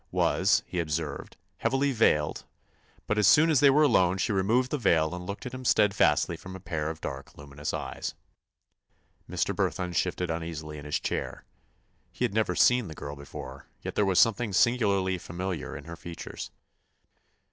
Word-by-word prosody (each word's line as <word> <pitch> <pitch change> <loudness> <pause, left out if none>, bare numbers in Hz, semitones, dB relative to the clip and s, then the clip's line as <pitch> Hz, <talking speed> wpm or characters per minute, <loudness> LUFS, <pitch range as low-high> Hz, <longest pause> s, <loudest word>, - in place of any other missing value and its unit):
—was, - - +2
he 90 - -4
observed, 75 -2 -3 0.2
heavily 135 +6 +1
veiled, 75 - +2 0.6
but 105 - 0
as 105 - +4
soon 160 +2 +6
as 150 - +4
they 140 - +6
were 150 +3 +5
alone 95 -10 +3
she 95 - 0
removed 110 +6 +1
the 150 - 0
veil 80 -7 +2
and 90 0 -6
looked 100 0 -6
at 125 - -6
him 130 0 -6
steadfastly 105 -4 +3
from 95 0 -10
a - - -8
pair 80 -4 -3
of 80 0 -6
dark, 65 0 -7
luminous 75 +1 -6
eyes. - - -5 1.1
Mr. - - -1
Burthon 90 -1 -1
shifted 90 +2 -1
uneasily 80 -2 -5
in 70 - -10
his 75 - -1
chair. - - -4 0.7
He 125 - -1
had 110 - -3
never 110 0 +1
seen 125 -3 +4
the 80 - -8
girl 70 0 -7
before, 70 -1 -9 0.2
yet - - -4
there - - +2
was 95 -2 +1
something 110 +3 +3
singularly 100 -5 +2
familiar 90 0 -5
in 70 - -10
her 85 +2 -8
features. 85 0 -8
90 Hz, 175 wpm, -28 LUFS, 80-110 Hz, 1.1 s, soon